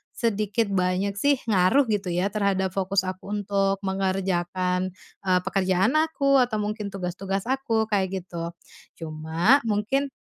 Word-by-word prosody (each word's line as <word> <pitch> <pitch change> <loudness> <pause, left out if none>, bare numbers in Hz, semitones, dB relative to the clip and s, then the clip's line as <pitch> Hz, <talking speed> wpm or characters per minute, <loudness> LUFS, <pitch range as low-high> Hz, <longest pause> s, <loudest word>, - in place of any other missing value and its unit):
sedikit 215 -1 0
banyak 185 +1 +1
sih 285 +4 +4
ngaruh 210 +5 +4
gitu 205 -3 -1
ya 180 +3 0
terhadap 195 -3 0
fokus 190 0 0
aku 185 +2 -5
untuk 195 -1 +1
mengerjakan, 185 -1 0 0.4
eee, 185 -1 +4
pekerjaan 190 +2 +1
aku 280 -4 +3
atau 245 -3 +2
mungkin 210 0 -3
tugas-tugas 195 0 -3
aku, 240 -3 0
kayak 190 -2 0
gitu. 170 -1 -6 0.4
Cuma 160 - +2
mungkin 225 +7 0
195 Hz, 130 wpm, -25 LUFS, 185-215 Hz, 0.4 s, sih